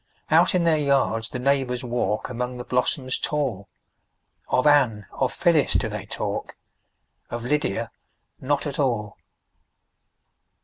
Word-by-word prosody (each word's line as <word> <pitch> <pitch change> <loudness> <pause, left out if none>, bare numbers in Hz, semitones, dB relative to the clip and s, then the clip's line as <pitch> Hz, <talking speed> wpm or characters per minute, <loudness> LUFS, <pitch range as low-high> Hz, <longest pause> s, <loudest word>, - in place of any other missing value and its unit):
Out - - +5
in 180 - +2
their 160 -2 +3
yards 135 -6 +1
the - - -5
neighbors 130 -1 0
walk, 120 -4 -1
Among 125 +1 -4
the 125 - -5
blossoms 130 +1 0
tall; 125 -10 -2 0.8
Of 125 - +2
Anne, 130 -9 +4
of 130 - -1
Phyllis, 165 -5 +2
do - - +1
they - - -6
talk, - - -4 0.7
Of 120 0 -5
Lydia 115 -5 -1 0.5
not 140 +3 0
at 145 -1 -4
all. 115 -7 0
125 Hz, 130 wpm, -24 LUFS, 115-145 Hz, 0.8 s, Out